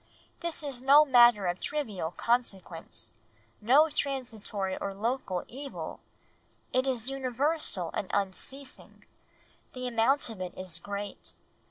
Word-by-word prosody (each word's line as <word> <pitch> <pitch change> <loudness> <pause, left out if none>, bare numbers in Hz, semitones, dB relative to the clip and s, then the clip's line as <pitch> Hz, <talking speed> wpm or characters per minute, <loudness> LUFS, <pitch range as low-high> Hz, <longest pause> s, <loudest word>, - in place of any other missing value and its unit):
This 340 -2 -3
is 270 -4 -1
no 285 +3 +7
matter 240 -6 +6
of 175 0 -1
trivial 220 - -2
consequence; 180 - -2 0.5
no 270 +9 +6
transitory 225 -10 -2
or 195 -1 -4
local 215 -4 -2
evil; 275 +2 -7 0.7
it 255 +1 +2
is 255 -1 -1
universal 265 - -1
and 190 - -3
unceasing; 225 +8 -4 0.7
the 255 0 -5
amount 240 +2 +2
of 205 -4 -8
it 180 -1 -5
is 185 -3 -5
great 200 +2 -6
240 Hz, 120 wpm, -30 LUFS, 195-270 Hz, 0.7 s, no